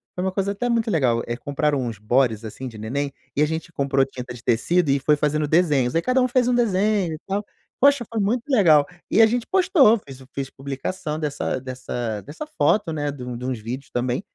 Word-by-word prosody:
foi 180 - -2
uma 190 - 0
coisa 200 0 0
até 245 +5 -2
muito 230 -2 +1
legal, 125 -8 +2
eh, 120 0 -3
compraram 145 +2 0
uns 115 -4 -4
bodies, 115 +1 +1
assim, 130 +4 -7
de 110 -3 -9
neném, 140 +6 -3 0.2
e - - +3
a - - +6
gente 160 +2 -4
comprou 135 -2 +1
tinta 125 -2 -8
de 120 - -12
tecido 150 +7 +2
e 140 0 +3
foi 150 +3 +3
fazendo 150 0 0
desenhos. 150 -6 +2
Aí 165 - +3
cada 255 +4 +2
um 250 - +3
fez 245 0 +2
um - - +2
desenho 205 -5 +1
e 155 - -7
tal. 200 +2 -2 0.4
Poxa, 280 -2 +5
foi 225 - -2
muito 225 +4 0
legal. 160 - +5 0.2
E 225 - +4
a - - +9
gente 235 +1 -1
postou, 345 - +5
fez 135 -6 -12
fiz 135 -1 -3
publicação 150 +4 -5
dessa 145 -3 -2
dessa 120 -4 -4
dessa 155 - -8
foto, 210 - +1
né, 145 -2 -2
de 135 -3 -9
um 125 -1 -5
de 125 - -6
uns 130 -2 -2
vídeos 125 +5 -6
também. 125 +5 -1
150 Hz, 225 wpm, -23 LUFS, 130-200 Hz, 0.4 s, a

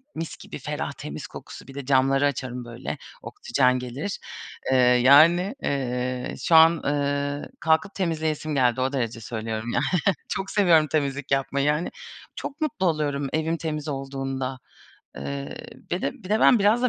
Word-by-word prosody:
mis 165 0 -5
gibi - - -9
ferah - - -3
temiz - - -7
kokusu, - - -11
bir 135 - -11
de 140 -2 -6
camları 135 +1 +3
açarım 125 -3 -2
böyle 120 0 -6 0.2
oksijen 125 0 +1
gelir. 130 +11 -5 0.5
Iıı, 125 -1 +5
yani, 170 - +6
ııı, 125 -2 -2
şu 165 - +2
an, 160 +1 +9
ııı, 145 0 -1
kalkıp 160 +5 +1
temizleyesim 155 -4 -1
geldi, 125 -1 +2
o 135 +2 0
derece 115 -3 -2
söylüyorum 110 +1 -4
yani. - - +1 0.4
Çok 195 0 -3
seviyorum 170 -7 +4
temizlik 140 -2 -1
yapmayı, 135 +1 +1
hani. 150 +4 -2 0.4
Çok 290 +3 -6
mutlu 235 -11 -1
oluyorum 145 -4 0
evim 160 +1 0
temiz 155 -2 -4
olduğunda. 135 -2 -4 0.6
Iıı, 140 - -5 0.4
bir 175 - -1
de - - 0
bir 185 - -13
de 215 +2 +2
ben 245 - +6
biraz 215 +4 +3
da 250 - +4
140 Hz, 155 wpm, -25 LUFS, 130-160 Hz, 0.6 s, an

